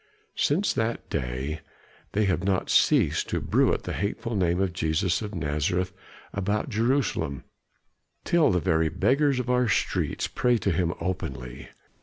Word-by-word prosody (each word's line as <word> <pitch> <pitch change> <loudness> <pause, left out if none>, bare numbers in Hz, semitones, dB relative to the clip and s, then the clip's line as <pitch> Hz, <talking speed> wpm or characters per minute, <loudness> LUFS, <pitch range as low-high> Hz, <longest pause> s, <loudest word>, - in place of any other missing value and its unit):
Since 175 +8 +1
that 115 +1 -2
day 65 +5 -3 0.5
they 105 +1 +2
have 90 -2 0
not 95 -1 0
ceased - - +3
to - - 0
bruit - - +2
the - - -4
hateful 105 +4 -3
name 90 -2 +1
of 95 -2 0
Jesus 85 +3 0
of 105 -1 -5
Nazareth 85 +4 -1 0.4
about 100 +2 -1
Jerusalem, 115 - 0 0.8
till 170 -2 +3
the 90 -2 +2
very 80 -2 +2
beggars 135 - +2
of 125 - -3
our 125 0 +2
streets 110 - 0
pray 125 -1 +1
to 100 - 0
him 85 0 +1
openly. 70 -8 -5
95 Hz, 145 wpm, -26 LUFS, 80-115 Hz, 0.8 s, ceased